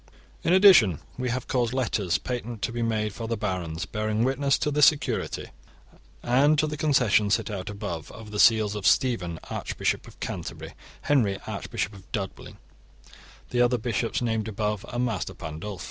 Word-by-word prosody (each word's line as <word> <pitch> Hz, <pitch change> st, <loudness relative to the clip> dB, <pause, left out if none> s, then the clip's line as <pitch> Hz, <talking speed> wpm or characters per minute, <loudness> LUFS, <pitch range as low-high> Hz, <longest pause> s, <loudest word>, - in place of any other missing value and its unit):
In 165 Hz, -, +1 dB
addition 180 Hz, -, +7 dB, 0.2 s
we 125 Hz, 0 st, -2 dB
have 125 Hz, +1 st, -3 dB
caused 120 Hz, -2 st, 0 dB
letters 105 Hz, -8 st, 0 dB
patent 120 Hz, -4 st, -5 dB
to 120 Hz, -, 0 dB
be 120 Hz, 0 st, -3 dB
made 110 Hz, -2 st, 0 dB
for 115 Hz, +1 st, -6 dB
the 115 Hz, 0 st, -2 dB
barons, 90 Hz, -4 st, -3 dB
bearing 110 Hz, +2 st, -1 dB
witness 135 Hz, +2 st, +2 dB
to 150 Hz, -, -1 dB
this 145 Hz, 0 st, +6 dB
security 150 Hz, -3 st, 0 dB, 0.7 s
and 140 Hz, +5 st, +4 dB
to 155 Hz, -, +3 dB
the 150 Hz, 0 st, -3 dB
concessions 125 Hz, -9 st, +3 dB
set -, -, -4 dB
out 95 Hz, -2 st, -5 dB
above, 100 Hz, -6 st, -5 dB
over 110 Hz, -2 st, -11 dB
the 105 Hz, -, -4 dB
seals 110 Hz, -2 st, +5 dB
of 105 Hz, -3 st, -1 dB
Stephen 95 Hz, -, +2 dB
archbishop -, -, -2 dB
of -, -, -15 dB
Canterbury, -, -, -6 dB, 0.3 s
Henry 115 Hz, -9 st, +2 dB
archbishop 105 Hz, -, -4 dB
of 95 Hz, -2 st, -15 dB
Dublin, 100 Hz, -5 st, -5 dB, 0.9 s
the 125 Hz, -, +2 dB
other 125 Hz, 0 st, +3 dB
bishops 115 Hz, +2 st, -1 dB
named 110 Hz, -2 st, -1 dB
above, 105 Hz, -1 st, -2 dB
and 120 Hz, +1 st, 0 dB
Master 110 Hz, -7 st, -3 dB
Pandulf. 85 Hz, +6 st, -6 dB
110 Hz, 170 wpm, -26 LUFS, 100-125 Hz, 0.9 s, addition